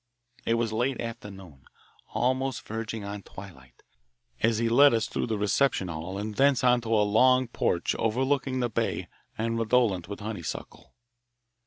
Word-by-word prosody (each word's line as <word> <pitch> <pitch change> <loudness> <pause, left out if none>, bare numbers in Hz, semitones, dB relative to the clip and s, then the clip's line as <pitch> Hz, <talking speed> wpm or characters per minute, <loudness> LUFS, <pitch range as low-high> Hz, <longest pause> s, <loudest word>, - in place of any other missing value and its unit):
It 115 - +3
was 115 -1 -1
late 125 +3 0
afternoon, 95 - -8 0.4
almost 130 +1 -1
verging 110 -1 -5
on 100 0 -6
twilight, 85 -12 -13 0.6
as 115 0 +3
he 115 +1 +1
led 135 +3 +6
us 110 - 0
through - - -2
the 110 -2 -1
reception 105 -1 +1
hall 85 +4 -5
and 105 +1 -4
thence 135 +2 +3
onto 120 -2 +2
a 105 -2 +4
long 130 +5 +4
porch 85 -6 0
overlooking 130 +3 0
the 120 - 0
bay - - -2 0.3
and 115 +1 -1
redolent 110 -6 +2
with 100 - -6
honeysuckle. 105 -5 -7
115 Hz, 150 wpm, -27 LUFS, 100-125 Hz, 0.6 s, led